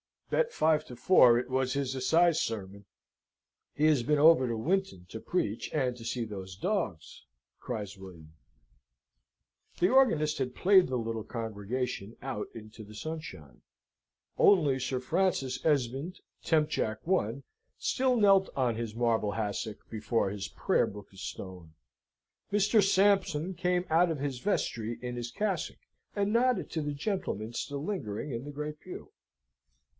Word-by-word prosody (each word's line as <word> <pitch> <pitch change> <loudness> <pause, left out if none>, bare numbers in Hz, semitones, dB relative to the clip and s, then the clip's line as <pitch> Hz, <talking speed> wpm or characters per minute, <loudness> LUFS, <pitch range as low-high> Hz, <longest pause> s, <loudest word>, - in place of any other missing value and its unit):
"Bet 485 -1 +2
five 155 -1 +2
to 125 - -10
four 125 -3 +6
it 125 - -2
was 130 0 0
his 140 -2 -1
Assize 160 +6 +3
sermon. 100 -2 -5 0.9
He 150 - +2
has 150 -5 +4
been 150 +5 +1
over 155 -3 +6
to 115 - -1
Winton 175 - -1
to 110 - -7
preach, 110 - -2
and 130 -5 0
to 115 - -10
see 120 0 -2
those 95 -4 -7
dogs," 100 - -3 0.3
cries 105 -5 -5
William. 85 -5 -12 1.5
The 180 - +4
organist 165 - +3
had 130 -2 -3
played 190 -1 +5
the 130 - -2
little 115 -2 -3
congregation 115 0 -4
out 130 -5 -4
into 110 0 -10
the 105 +1 -13
sunshine. 110 - -7 0.8
Only 150 -9 +4
Sir 130 0 -2
Francis 135 -4 0
Esmond, 140 +3 0 0.2
temp. 155 -2 +2
Jac. 110 -6 -1
I., 140 - 0 0.3
still 260 -1 +1
knelt 195 -4 +5
on 125 -4 +1
his 115 -2 -4
marble 115 -3 +1
hassock, 105 0 -4
before 110 -2 -1
his 100 -1 -4
prayer - - +1
book 100 0 -10
of 95 - -14
stone. 90 -5 -8 0.8
Mr. 205 +2 +4
Sampson 190 -3 +2
came 180 0 0
out 170 +2 +4
of 160 -3 -2
his 135 -3 -3
vestry 120 - -1
in 125 0 -5
his 120 0 -4
cassock, 195 - -2 0.4
and 205 0 0
nodded 245 -3 +2
to 160 - -2
the 145 -1 -3
gentlemen 140 - -3
still 140 +3 -4
lingering 150 - -4
in 120 +2 -4
the 145 - -6
great 150 +1 -5
pew. 185 - -10
130 Hz, 150 wpm, -30 LUFS, 110-175 Hz, 1.5 s, four